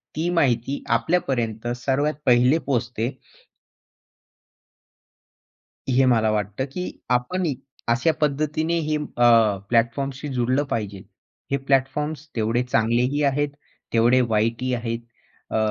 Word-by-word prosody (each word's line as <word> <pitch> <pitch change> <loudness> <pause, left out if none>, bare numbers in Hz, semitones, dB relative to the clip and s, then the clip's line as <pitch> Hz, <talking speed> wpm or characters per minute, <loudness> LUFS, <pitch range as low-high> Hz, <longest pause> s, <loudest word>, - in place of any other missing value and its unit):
ती 165 +3 -1
माहिती 135 -5 +1
आपल्यापर्यंत 120 -6 -1
सर्वात 140 +4 0
पहिले 125 +4 +5
पोहचते. 120 -2 -1 2.8
हे 130 +1 +4
मला 115 -3 +3
वाटतं 105 +4 -2
की 180 0 -4 0.2
आपणही 140 +6 0 0.4
अशा 130 +8 +3
पद्धतीने 155 +3 0
हे 155 -1 -1
अ, 120 -7 +3
प्लॅटफॉर्म्सशी 130 +4 0
जुडलं 130 +3 +1
पाहिजे. 100 -4 -3 0.5
हे 140 - +2
प्लॅटफॉर्म्स 140 +3 -1
तेवढे 115 +2 +1
चांगलेही 125 +4 +1
आहेत, 145 +1 +1 0.4
तेवढे 120 +3 +4
वाईटही 115 +2 0
आहेत. 115 -1 -2 0.5
अ, - - +2
125 Hz, 105 wpm, -23 LUFS, 115-145 Hz, 2.8 s, पहिले